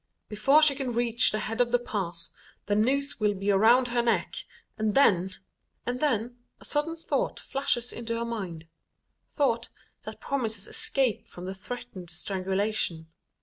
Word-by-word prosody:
Before 270 +9 +4
she 300 -2 +8
can 265 -3 -3
reach 235 0 +4
the 215 - 0
head 225 +3 -1
of 240 -1 +1
the 245 - +5
pass, 180 -8 -4 0.3
the 205 - 0
noose 275 +6 +1
will 210 -1 +2
be 195 +1 0
around 235 +6 +5
her 240 0 +2
neck, 235 -1 0 0.4
and 215 -1 -1
then 190 -9 +4 0.6
And 245 +1 -2
then, 245 -4 0 0.2
a - - -12
sudden 315 +3 0
thought - - -2
flashes 255 -3 -1
into 230 0 -3
her 235 - -2
mind 190 -9 -5 0.6
thought 235 -6 0 0.3
that - - -9
promises 225 -7 -2
escape 265 -5 0
from 180 - -10
the 190 - -4
threatened 200 -3 -8
strangulation. 190 -2 0
230 Hz, 155 wpm, -28 LUFS, 200-250 Hz, 0.6 s, she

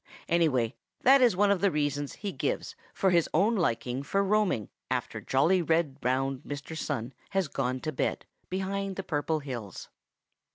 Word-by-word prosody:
Anyway, 145 -9 +2 0.3
that 270 +1 +7
is 240 -6 +5
one 200 +2 +4
of 200 - +1
the 200 - +4
reasons 145 -3 -1
he 205 -2 -4
gives - - -2 0.2
for 190 -2 +2
his 170 -2 +3
own 205 +8 +4
liking 125 - 0
for 195 +8 0
roaming 195 - +1 0.2
after - - -2
jolly, 165 +8 +3
round, 165 - -7 0.3
red 130 +1 0
Mr. 145 +2 -6
Sun 130 -5 -3 0.2
has 195 -3 0
gone 130 -2 -2
to 155 - -2
bed 135 - -2 0.2
behind 195 +1 -2
the 195 - -4
Purple 155 -2 -1
Hills. 120 -9 -7
160 Hz, 165 wpm, -29 LUFS, 135-195 Hz, 0.3 s, that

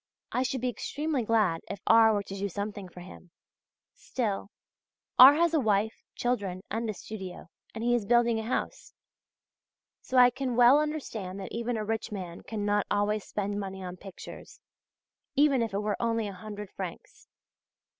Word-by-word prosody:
I 250 - 0
should 260 -1 -1
be 255 - 0
extremely 290 +3 -2
glad 215 -7 +2
if 200 - -5
R. 225 -1 +6
were 205 -2 0
to 195 - -8
do 200 +1 -2
something 200 0 -5
for 180 - -12
him; 180 0 -12 0.6
still 225 - -3 0.7
R. 265 +3 +11
has 335 +1 +2
a 315 - +4
wife, 220 -2 +1
children, 200 -7 -2
and 225 +2 -2
a - - -1
studio, 190 -4 -8 0.3
and 225 - -4
he 240 +1 +2
is 230 -4 0
building 235 -1 +3
a - - -4
house; 230 - -4 1.1
so 260 - -2
I 250 0 +8
can 260 -1 -3
well 245 +4 +7
understand 230 -11 -4
that 190 - -7
even 235 0 -2
a 215 - -3
rich 220 0 -2
man 180 -4 -6
cannot 205 -1 -1
always 205 0 +1
spend 205 0 -3
money 190 -1 -6
on 180 0 -6
pictures, 190 0 -11 0.8
even 280 -3 +4
if 230 - -1
it 200 +1 -1
were 210 -1 -2
only 230 -2 0
a 200 - -6
hundred 210 +1 -8
francs. 185 -3 -8
215 Hz, 175 wpm, -29 LUFS, 200-245 Hz, 1.1 s, R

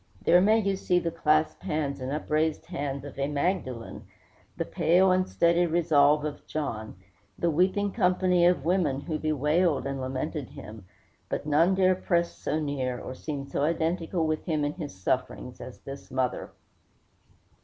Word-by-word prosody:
There 175 +1 +6
may 215 +3 +5
you 195 -3 0
see 180 -1 +1
the 170 -1 0
clasped 155 -1 +1
hands 150 -6 -2
and 130 +1 -3
upraised 155 +1 -1
eyes 140 -3 -3
of 140 -1 -9
a 140 - +1
Magdalen, 145 -6 -3 0.5
the - - -1
pale 185 +3 +3
and 185 0 +1
steady 170 +1 +3
resolve 150 -3 +3
of 150 -1 -6
John, 115 -8 -4 0.4
the 170 - +1
weeping 190 +5 +1
company 180 -1 +3
of 175 -5 +1
women 165 -6 +1
who 155 0 -3
bewailed 155 +2 +1
and 135 -1 -3
lamented 130 +2 -3
him; 105 -3 -11 0.4
but - - -3
none 165 +5 +3
dare 185 -1 +4
press 170 -2 0
so 155 - -2
near, 135 -4 -2
or - - -7
seem 140 +1 -5
so 140 - -3
identical 165 +2 0
with 155 0 -1
him 155 -4 0
in 145 - -2
his 155 - -7
sufferings, 125 +5 -3
as 130 - -9
this 135 0 -9
mother. 130 -1 -2
155 Hz, 165 wpm, -27 LUFS, 140-175 Hz, 0.5 s, There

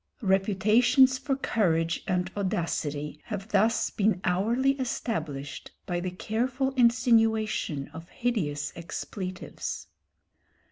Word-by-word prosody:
Reputations 215 +7 +4
for 270 +1 -1
courage 165 -11 0
and 180 0 0
audacity 155 -6 -2
have 205 -1 -5
thus 220 +2 +2
been 205 -2 +1
hourly 230 +9 +2
established 155 - -3 0.2
by 175 -1 -1
the 185 +1 -2
careful 245 +8 -1
insinuation 225 - +2
of 165 +2 -10
hideous 155 - -2
expletives. 185 - -5
200 Hz, 95 wpm, -28 LUFS, 170-235 Hz, 0.2 s, Reputations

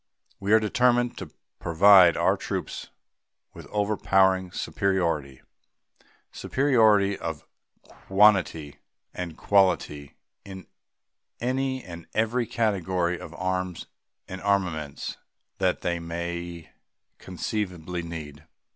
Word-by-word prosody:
We 100 +1 -2
are 110 - +7
determined 120 +2 +2
to - - -7 0.3
provide 90 0 +6
our - - +3
troops - - -5 0.6
with - - -11
overpowering 95 -3 +1
superiority 85 -11 -1 0.9
superiority 110 -8 +2
of 80 -2 -5 0.4
quantity 95 -7 +1 0.3
and 85 -3 -6
quality 85 -8 +1 0.3
in 95 -3 -10 0.7
any 130 +1 -1
and 85 -2 -10
every 115 +2 0
category 95 -6 0
of 80 +1 -10
arms 90 -1 -3 0.4
and 95 0 -7
armaments 90 -8 -2 0.4
that - - +1
they 85 -1 -1
may 85 0 -6 0.5
conceivably 90 -2 -4
need. 80 -4 -8
95 Hz, 95 wpm, -26 LUFS, 85-105 Hz, 0.9 s, are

